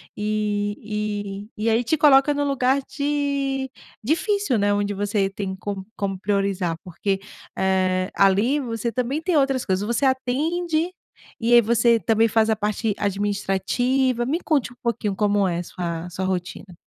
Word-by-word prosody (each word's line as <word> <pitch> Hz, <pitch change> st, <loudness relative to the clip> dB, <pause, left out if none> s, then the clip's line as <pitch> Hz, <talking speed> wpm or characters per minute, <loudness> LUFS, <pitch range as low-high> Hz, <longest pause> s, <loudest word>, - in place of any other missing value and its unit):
E 210 Hz, -1 st, -3 dB
e 215 Hz, -, -4 dB
e -, -, +3 dB
aí 225 Hz, +2 st, +2 dB
te 315 Hz, +7 st, +1 dB
coloca 290 Hz, -1 st, +5 dB
no 290 Hz, 0 st, -1 dB
lugar 275 Hz, 0 st, +2 dB
de 280 Hz, -2 st, -1 dB, 0.3 s
difícil, 330 Hz, -, +1 dB
né. 205 Hz, 0 st, +2 dB
Onde 205 Hz, 0 st, 0 dB
você 200 Hz, 0 st, 0 dB
tem 195 Hz, -1 st, -4 dB
com 195 Hz, 0 st, -5 dB
como 195 Hz, -2 st, -2 dB
priorizar, 195 Hz, -3 st, -1 dB
porque, 195 Hz, +2 st, -2 dB, 0.4 s
eh, 185 Hz, 0 st, +1 dB
ali, 205 Hz, +9 st, +3 dB
você 235 Hz, -2 st, -3 dB
também 255 Hz, +5 st, -2 dB
tem 355 Hz, 0 st, 0 dB
outras 270 Hz, -3 st, +2 dB
coisas. 190 Hz, +1 st, 0 dB
Você 235 Hz, +5 st, 0 dB
atende, 310 Hz, +6 st, 0 dB, 0.5 s
e 235 Hz, +1 st, +2 dB
aí 240 Hz, -, +9 dB
você 230 Hz, +1 st, +3 dB
também 225 Hz, 0 st, +2 dB
faz 220 Hz, +1 st, +2 dB
a 220 Hz, -, +3 dB
parte 210 Hz, +1 st, -1 dB
administrativa, 205 Hz, +6 st, 0 dB
me 300 Hz, +7 st, 0 dB
conte 290 Hz, -8 st, 0 dB
um 245 Hz, -, -17 dB
pouquinho 230 Hz, -4 st, -1 dB
como 205 Hz, -1 st, +2 dB
é 175 Hz, -2 st, -1 dB
sua 170 Hz, -1 st, -5 dB
sua 180 Hz, +2 st, -4 dB
rotina. 185 Hz, 0 st, -4 dB
215 Hz, 155 wpm, -23 LUFS, 200-265 Hz, 0.5 s, aí